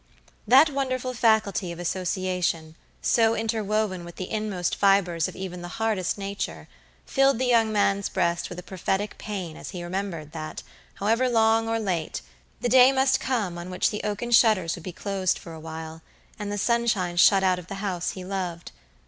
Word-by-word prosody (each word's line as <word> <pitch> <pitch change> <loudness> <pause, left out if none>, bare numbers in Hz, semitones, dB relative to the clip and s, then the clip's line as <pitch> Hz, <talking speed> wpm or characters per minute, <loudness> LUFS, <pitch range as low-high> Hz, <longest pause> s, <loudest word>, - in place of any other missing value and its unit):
That 275 +6 +7
wonderful 255 -2 -2
faculty 215 -6 +2
of 170 - -7
association, 180 -2 -2 0.3
so 225 -1 +3
interwoven 215 -4 -1
with 170 0 -10
the 185 - -6
inmost 210 -5 -1
fibers 190 -5 +3
of - - -9
even 180 -2 -6
the 175 - -6
hardest 215 -5 0
nature, 195 - -5 0.4
filled 270 -2 +3
the 260 - 0
young 230 -3 +3
man's 200 -1 +1
breast 170 -2 0
with 175 - -8
a 180 - -7
prophetic 190 +2 -3
pain 185 -7 -5
as - - -8
he 180 -3 -6
remembered 175 -4 -4
that, 155 -1 -6 0.3
however 230 +5 +1
long 225 -1 +3
or 225 - +1
late, 180 -8 -2 0.4
the - - 0
day 255 +2 +7
must 265 0 +3
come 205 -10 -2
on 175 +1 -7
which 180 - +1
the 210 - -4
oaken 210 +3 -3
shutters 215 -8 +4
would 170 - -10
be 185 - -5
closed 190 0 -1
for 165 - -10
awhile, 160 0 -8 0.4
and 205 -1 -4
the 205 - -2
sunshine 220 -5 +1
shut 190 +2 +6
out 185 -1 +2
of 180 - -12
the 195 - -6
house 195 -3 -2
he 185 -1 -8
loved. 180 -3 -4
195 Hz, 180 wpm, -25 LUFS, 175-225 Hz, 0.4 s, That